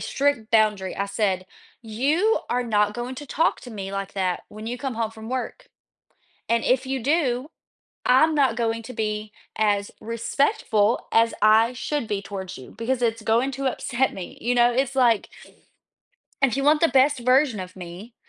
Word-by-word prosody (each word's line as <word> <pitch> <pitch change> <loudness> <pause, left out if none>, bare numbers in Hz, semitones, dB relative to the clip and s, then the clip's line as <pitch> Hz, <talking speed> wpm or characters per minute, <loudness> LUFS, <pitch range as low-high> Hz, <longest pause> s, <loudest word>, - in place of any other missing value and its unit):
strict 275 -6 0
boundary, 210 -4 +2
I 200 0 -1
said, 195 -3 -1 0.4
you 290 - +1
are 250 +1 +1
not 210 -2 +1
going 245 +2 -4
to 290 - -8
talk 320 +5 +1
to 245 - -9
me 195 -2 -6
like 195 0 -4
that 185 -2 -1
when 215 +1 -9
you 245 +1 -4
come 265 -2 -3
home 225 -1 -2
from 220 0 -10
work 260 - -4 0.8
and 230 0 +2
if 260 +1 +2
you 265 -1 -2
do, 280 -2 +1 0.6
I'm 310 +5 +5
not 280 -3 +3
going 230 -1 -1
to 250 - -9
be 215 -1 -3 0.2
as 205 -2 +1
respectful 230 -1 0
as 230 0 +4
I 220 +3 +5
should 270 0 -3
be 205 -2 -2
towards 190 -4 -7
you 130 - -12
because 245 +3 -1
it's 230 -2 0
going 235 +5 +2
to 270 +1 -3
upset 260 0 0
me, 185 -2 -8
you 245 +2 +1
know, 240 0 +4
it's, 265 +2 0
like 240 -5 +3 1.1
if 270 -2 +3
you 275 - -1
want 300 +1 +4
the 330 - +4
best 265 0 +3
version 255 -3 +3
of 185 +1 -9
me, 185 +6 -9
235 Hz, 180 wpm, -24 LUFS, 210-260 Hz, 1.1 s, I'm